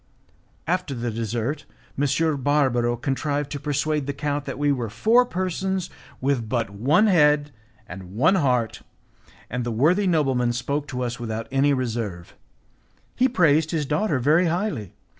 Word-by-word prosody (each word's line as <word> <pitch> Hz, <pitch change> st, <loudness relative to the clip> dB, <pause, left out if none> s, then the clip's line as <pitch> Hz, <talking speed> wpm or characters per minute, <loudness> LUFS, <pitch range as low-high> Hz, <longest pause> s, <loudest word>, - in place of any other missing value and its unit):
After 175 Hz, -5 st, -1 dB
the 120 Hz, 0 st, -3 dB
dessert, 115 Hz, +6 st, -3 dB, 0.3 s
M. 145 Hz, +2 st, +1 dB, 0.3 s
Barbaro 125 Hz, -4 st, +2 dB
contrived 145 Hz, +3 st, -2 dB
to 145 Hz, -, -4 dB
persuade 145 Hz, 0 st, -1 dB
the 140 Hz, -, -2 dB
count 145 Hz, 0 st, -2 dB
that 135 Hz, -, -5 dB
we 145 Hz, 0 st, +2 dB
were 120 Hz, -5 st, -2 dB
four 225 Hz, -, +3 dB
persons 185 Hz, 0 st, -2 dB, 0.3 s
with 130 Hz, -5 st, -1 dB
but 115 Hz, -5 st, -1 dB
one 135 Hz, -, +3 dB
head 150 Hz, -6 st, +3 dB, 0.4 s
and 95 Hz, 0 st, -10 dB
one 150 Hz, -, +4 dB
heart, 125 Hz, -, +1 dB, 0.7 s
and 125 Hz, +1 st, -3 dB
the 120 Hz, -, -3 dB
worthy 165 Hz, -, +2 dB
nobleman 135 Hz, -8 st, +1 dB
spoke 140 Hz, +4 st, -2 dB
to 125 Hz, -2 st, -3 dB
us 120 Hz, 0 st, -4 dB
without 115 Hz, -1 st, -4 dB
any 135 Hz, +2 st, +3 dB
reserve. 115 Hz, -9 st, -3 dB, 0.8 s
He 255 Hz, +1 st, +3 dB
praised 160 Hz, -, +3 dB
his 160 Hz, -3 st, -1 dB
daughter 150 Hz, +2 st, 0 dB
very 155 Hz, +8 st, +3 dB
highly. 170 Hz, -, -2 dB
140 Hz, 150 wpm, -24 LUFS, 120-155 Hz, 0.8 s, one